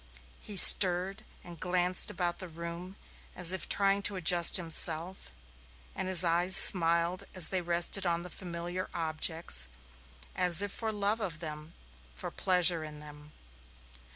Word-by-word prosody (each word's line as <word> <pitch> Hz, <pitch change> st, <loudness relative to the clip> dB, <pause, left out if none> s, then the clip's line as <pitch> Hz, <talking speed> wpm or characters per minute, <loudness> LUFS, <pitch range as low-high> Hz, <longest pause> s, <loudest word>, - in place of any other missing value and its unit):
He 205 Hz, -, -6 dB
stirred 190 Hz, +3 st, +7 dB, 0.2 s
and 170 Hz, -2 st, -13 dB
glanced 180 Hz, 0 st, +1 dB
about 175 Hz, -1 st, -5 dB
the 185 Hz, -, -8 dB
room 170 Hz, +3 st, -10 dB, 0.4 s
as 180 Hz, -1 st, +2 dB
if 190 Hz, -, -5 dB
trying 200 Hz, 0 st, 0 dB
to 200 Hz, -, -9 dB
adjust 175 Hz, -1 st, +3 dB
himself, 170 Hz, +1 st, -3 dB, 0.7 s
and -, -, -5 dB
his 185 Hz, -2 st, +2 dB
eyes 175 Hz, +2 st, 0 dB
smiled 170 Hz, 0 st, +1 dB
as 185 Hz, -3 st, +2 dB
they 185 Hz, -1 st, -2 dB
rested 175 Hz, +3 st, -1 dB
on 170 Hz, -1 st, -3 dB
the 180 Hz, -, -11 dB
familiar 175 Hz, 0 st, -7 dB
objects, 160 Hz, -, -3 dB, 0.7 s
as 180 Hz, +1 st, +4 dB
if 205 Hz, -, -5 dB
for 225 Hz, 0 st, -6 dB
love 210 Hz, +1 st, -3 dB
of 185 Hz, -7 st, -7 dB
them, 155 Hz, 0 st, -10 dB, 0.4 s
for -, -, -8 dB
pleasure 180 Hz, -3 st, 0 dB
in 150 Hz, -1 st, -11 dB
them. 150 Hz, 0 st, -15 dB
175 Hz, 145 wpm, -28 LUFS, 165-185 Hz, 0.7 s, stirred